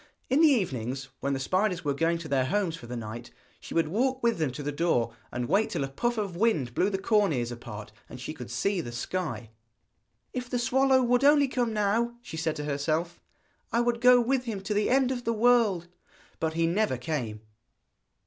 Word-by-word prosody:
In 275 +4 +4
the 325 - +8
evenings, 135 - 0
when 140 +1 -1
the 135 - -2
spiders 185 +4 0
were 145 - +1
going 165 +4 +1
to 165 -1 -7
their 135 -3 +1
homes 175 +3 0
for 125 -7 -11
the 120 0 -5
night, 115 +1 -7 0.3
she - - -9
would 165 -2 +3
walk 260 +7 0
with 235 -5 +2
them 155 -5 0
to 145 - -6
the 145 - -2
door 140 -7 +1 0.2
and 120 0 -3
wait 200 +6 +2
till - - -2
a - - -2
puff 240 - -1
of 200 -5 -2
wind 170 - +1
blew 185 +10 +2
the 195 - -1
corn 205 -1 +2
ears 120 -4 -1
apart, 110 -3 -8 0.2
and 125 - -9
she 130 - -5
could 125 -6 -9
see 180 +10 0
the 120 - -7
sky. 120 -2 -4 0.8
'If 250 -1 -4
the 245 - -1
swallow 260 +2 +3
would 245 +2 +2
only 285 0 +6
come 245 -3 -1
now,' 220 +3 +1
she - - -8
said 160 -1 -1
to 150 - -4
herself, 155 +4 -2 0.5
'I 235 - +2
would 240 -1 0
go 250 0 +7
with 250 +1 +1
him 215 -5 -4
to 200 +2 -2
the 205 0 +1
end 265 0 +3
of 245 -2 -3
the 230 - 0
world.' 220 -6 +3 0.5
But 160 -1 -1
he 165 0 +1
never 175 -4 +1
came! 120 -5 -4
175 Hz, 215 wpm, -28 LUFS, -, 0.8 s, the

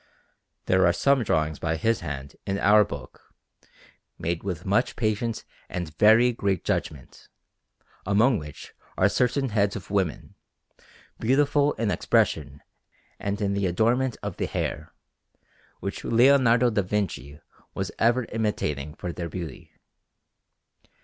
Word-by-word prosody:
There 95 -1 +4
are 85 - +3
some 140 +4 +2
drawings 80 -7 0
by 80 0 -1
his 115 +6 +1
hand 70 -4 -6
in 95 - -1
our 105 +1 +5
book, 70 -8 -9 1.0
made 85 0 -2
with 90 -4 -5
much 100 +6 +1
patience 110 0 -2 0.2
and 85 -4 -5
very 115 +4 +6
great 100 -6 -1
judgment, 70 -4 -4 0.7
among 110 +5 +3
which 75 -1 -10 0.2
are 95 - +4
certain 125 +5 0
heads 100 -2 +1
of 95 -3 -8
women, 95 -6 -1 0.9
beautiful 145 +4 +2
in 110 -2 -1
expression 75 -4 0 0.6
and 100 0 -3
in 100 -1 0
the 100 -1 0
adornment 115 +7 +1
of 100 -4 -5
the - - -1
hair, - - -4 0.9
which - - -5
Leonardo 120 -1 +4
da 105 -2 +1
Vinci 90 -8 -3 0.4
was - - -3
ever 120 +2 +3
imitating 75 -10 -2
for 90 - -5
their 85 -1 -5
beauty. 85 -1 -7
100 Hz, 130 wpm, -25 LUFS, 85-115 Hz, 1.0 s, very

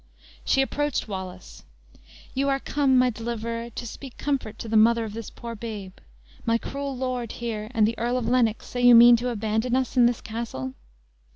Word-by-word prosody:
She 270 - +3
approached 290 -1 -2
Wallace: 185 -2 -8 0.7
"You 275 +1 0
are 275 0 +1
come, 275 -2 +2
my 250 0 +4
deliverer, 230 0 -4
to 240 +1 -7
speak 255 +3 -9
comfort 265 -7 -2
to - - -7
the 220 - -2
mother 230 +2 +5
of 215 -2 -6
this 225 -1 -6
poor 235 -1 -8
babe. 210 -4 -7 0.5
My 230 0 +2
cruel 275 +2 -5
lord 250 -3 -3
here, 220 -3 -4
and 220 -4 +3
the 230 - -2
Earl 240 +2 0
of 240 -3 -2
Lennox, 235 -3 +2
say 245 - -4
you 245 -1 +8
mean 240 +1 +9
to 245 +2 -2
abandon 220 +2 -1
us 260 0 -1
in 240 -1 +7
this 240 -1 -1
castle?" 215 - -5
235 Hz, 190 wpm, -25 LUFS, 220-250 Hz, 0.7 s, mean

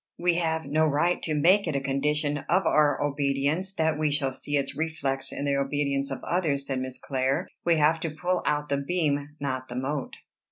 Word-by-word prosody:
"We 175 0 +2
have 160 -2 0
no 155 +3 +2
right 160 +5 +1
to 155 - -1
make 180 +6 +4
it 155 - -1
a - - +2
condition 145 +2 0
of 190 - +3
our 150 -2 +3
obedience, 145 +5 0
that 160 -1 +1
we 155 -1 +2
shall 140 -2 0
see 145 +2 -2
its 140 0 -2
reflex 140 -4 -2
in 140 - -4
the 140 -1 +1
obedience 140 0 0
of - - -5
others," 155 -6 0
said 135 -2 -2
Miss 130 0 -4
Clare. 130 0 -1 0.2
"We 170 -1 +4
have 155 +1 +3
to 165 - -2
pull 175 +4 -1
out 150 0 0
the 140 - +1
beam, 145 -1 -1
not 130 -2 -3
the 120 - -7
mote." 135 +2 -3
145 Hz, 205 wpm, -27 LUFS, 140-160 Hz, 0.2 s, make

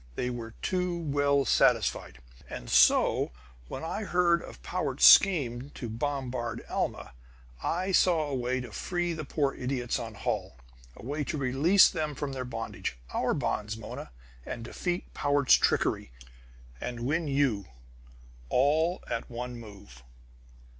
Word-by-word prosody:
They 125 - -2
were 115 -2 -7
too 180 -1 -1
well 145 -3 +1
satisfied. 60 - +2 0.3
"And - - -7
so, - - +5 0.4
when - - -6
I 185 +6 -3
heard 175 -3 +2
of - - -12
Powart's 150 -7 +1
scheme 140 -9 +6
to 120 - -5
bombard 125 -1 -3
Alma, - - -3 0.5
I 185 - -1
saw 170 -4 +3
a 145 - -4
way 130 0 -1
to 125 -3 -9
free 175 - -2
the 155 -2 -5
poor 140 -1 0
idiots 125 -2 -2
on 115 -2 -7
Holl! - - -3 0.4
A - - -13
way 145 +3 -2
to 150 - -3
release 140 +9 +5
them 150 -2 -3
from 140 +1 -4
their 130 -1 -4
bondage 115 - -5 0.2
OUR - - +1
bonds, 105 +1 -2
Mona 110 - -8 0.3
and 115 - -6
defeat 175 +8 -4
Powart's 145 -1 +3
trickery, - - +2 0.7
and 120 -1 -5
win 150 +6 0
you 135 -8 +1 0.8
all 155 +7 +2
at 115 - -4
one 125 +1 -5
move!" 100 - -13
135 Hz, 140 wpm, -29 LUFS, 120-160 Hz, 0.8 s, scheme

